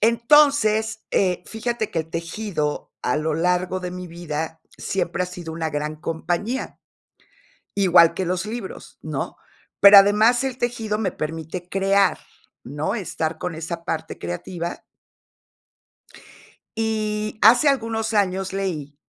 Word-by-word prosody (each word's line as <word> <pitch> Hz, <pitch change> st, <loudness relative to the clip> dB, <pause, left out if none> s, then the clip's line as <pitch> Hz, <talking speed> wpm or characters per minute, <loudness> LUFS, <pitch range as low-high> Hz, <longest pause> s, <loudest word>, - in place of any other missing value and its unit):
Entonces, 230 Hz, -2 st, +3 dB
eh, 180 Hz, -2 st, +1 dB
fíjate 225 Hz, 0 st, -3 dB
que 165 Hz, -, 0 dB
el 160 Hz, 0 st, -10 dB
tejido 165 Hz, -2 st, -3 dB
a 125 Hz, -, +1 dB
lo 155 Hz, 0 st, -1 dB
largo 180 Hz, +2 st, 0 dB
de 180 Hz, -1 st, -4 dB
mi 180 Hz, 0 st, -7 dB
vida 160 Hz, -1 st, -5 dB, 0.2 s
siempre 180 Hz, -2 st, -2 dB
ha -, -, -2 dB
sido 175 Hz, -3 st, -8 dB
una 160 Hz, -1 st, -3 dB
gran 150 Hz, +1 st, -3 dB
compañía. 175 Hz, +10 st, -3 dB, 1.0 s
Igual 175 Hz, -4 st, +6 dB
que 185 Hz, +2 st, -2 dB
los 180 Hz, +2 st, -1 dB
libros, 220 Hz, -2 st, -7 dB
¿no? -, -, -4 dB, 0.4 s
Pero, 200 Hz, 0 st, +10 dB
además, 215 Hz, +5 st, +5 dB
el 260 Hz, -2 st, -3 dB
tejido 230 Hz, -4 st, -2 dB
me 195 Hz, -4 st, 0 dB
permite 160 Hz, +3 st, -5 dB
crear, 195 Hz, -1 st, +2 dB, 0.4 s
¿no?, 145 Hz, -, -3 dB
estar 165 Hz, -6 st, -3 dB
con 180 Hz, -2 st, -4 dB
esa 165 Hz, +1 st, -5 dB
parte 160 Hz, -2 st, -4 dB
creativa. 170 Hz, -, -5 dB, 2.0 s
Y, 215 Hz, -1 st, -2 dB
hace 245 Hz, +7 st, +7 dB
algunos 225 Hz, -4 st, 0 dB
años, 190 Hz, -2 st, 0 dB
leí 170 Hz, -7 st, -3 dB
185 Hz, 130 wpm, -23 LUFS, 165-220 Hz, 2.0 s, Pero